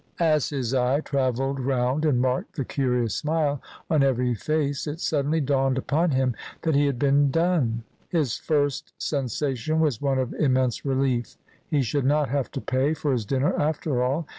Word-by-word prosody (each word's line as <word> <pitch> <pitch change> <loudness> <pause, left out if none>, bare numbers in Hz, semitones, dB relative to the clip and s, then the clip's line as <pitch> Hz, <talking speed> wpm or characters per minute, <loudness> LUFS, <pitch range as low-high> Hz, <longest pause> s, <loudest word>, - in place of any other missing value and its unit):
As 155 -4 +2
his 135 -4 -2
eye 130 +3 +2
travelled 135 -1 -1
round 130 +3 0
and 140 -5 +3
marked 130 0 -1
the 140 -5 -2
curious 125 -5 0
smile 150 -3 0 0.3
on 155 -3 +2
every 125 -2 +2
face 145 +5 -1
it 150 +2 -4
suddenly 150 -1 0
dawned 135 -2 +1
upon 160 +6 +1
him 130 -3 +1 0.3
that 160 - +1
he 145 +1 +3
had 140 -3 -1
been 140 +2 +3
"done." 140 -8 +1 0.3
His 155 - 0
first 145 -4 -1
sensation 140 +2 -1
was 150 -8 +1
one 135 -2 +1
of 130 -2 -1
immense 130 -4 +1
relief. 130 -4 0 0.3
He 145 -3 +1
should 135 +3 -1
not 145 0 +2
have 140 0 -1
to 135 - -4
pay 135 +4 0
for 150 -2 -1
his 115 -6 -1
dinner 135 +3 +1
after 150 -3 0
all! 135 +6 0
135 Hz, 175 wpm, -25 LUFS, 130-150 Hz, 0.3 s, and